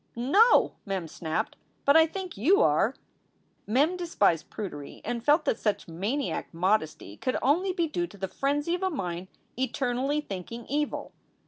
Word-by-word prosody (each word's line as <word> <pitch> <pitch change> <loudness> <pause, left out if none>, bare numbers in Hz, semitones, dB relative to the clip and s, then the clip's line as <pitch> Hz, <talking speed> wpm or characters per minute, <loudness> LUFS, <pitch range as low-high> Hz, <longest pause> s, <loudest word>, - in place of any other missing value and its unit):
"No!" 295 - +5
Mem 190 -4 -3
snapped. 160 0 -3 0.3
"But 280 - +5
I 320 0 +7
think 370 +1 -6
you 345 - +4
are." - - +3 0.7
Mem 290 - +2
despised 205 - +1
prudery 160 -9 -7
and 235 -1 -3
felt 295 +5 +4
that 225 - 0
such 210 -2 -1
maniac 205 - -2
modesty 170 - 0
could 255 - -1
only 345 +8 +3
be 345 -2 0
due 345 +3 -2
to 205 - -15
the 190 0 -3
frenzy 285 - -1
of 355 - -2
a 380 - +1
mind 180 - -4 0.3
eternally 260 +2 0
thinking 230 -2 -6
evil. 295 +2 -2
255 Hz, 155 wpm, -28 LUFS, 195-315 Hz, 0.7 s, I